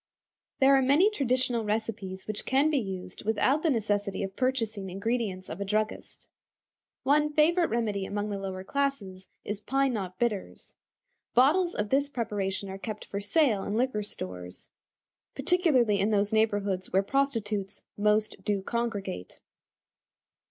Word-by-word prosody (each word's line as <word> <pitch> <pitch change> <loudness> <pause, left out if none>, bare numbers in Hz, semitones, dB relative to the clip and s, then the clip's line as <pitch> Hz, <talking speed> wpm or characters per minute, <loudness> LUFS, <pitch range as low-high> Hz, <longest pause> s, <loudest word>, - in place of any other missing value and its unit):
There 275 +1 +6
are 270 - +4
many 295 +11 +4
traditional 255 - +1
recipes 210 -3 -3
which 215 -1 -2
can 275 +4 +2
be 290 - +2
used 185 -4 -6
without 225 +7 +2
the 325 - +2
necessity 205 -5 0
of 195 0 -5
purchasing 225 -7 -1
ingredients 200 -1 -2
of 185 - -6
a - - +1
druggist. 215 +2 -2 0.8
One 300 +2 +3
favorite 330 +3 +3
remedy 210 -4 -1
among 205 +1 -3
the 200 - -3
lower 190 -1 -5
classes 200 -7 -2 0.2
is 205 0 -4
"Pine 270 +1 +1
Knot 185 -4 -4
Bitters." 220 -4 -3 0.6
Bottles 325 +9 +4
of 210 0 -2
this 280 +3 +2
preparation 205 -6 -2
are 190 0 -7
kept 215 0 -6
for 200 - -4
sale 220 -3 +2
in 205 - -3
liquor 240 -2 +1
stores, 90 - -6 0.7
particularly 265 - +3
in 200 +2 +2
those 205 0 +2
neighborhoods 205 -4 +1
where 190 +1 +3
prostitutes 210 -6 -1
"most 210 -1 +1
do 200 -1 -1
congregate." 205 - -3
215 Hz, 145 wpm, -28 LUFS, 195-260 Hz, 0.8 s, There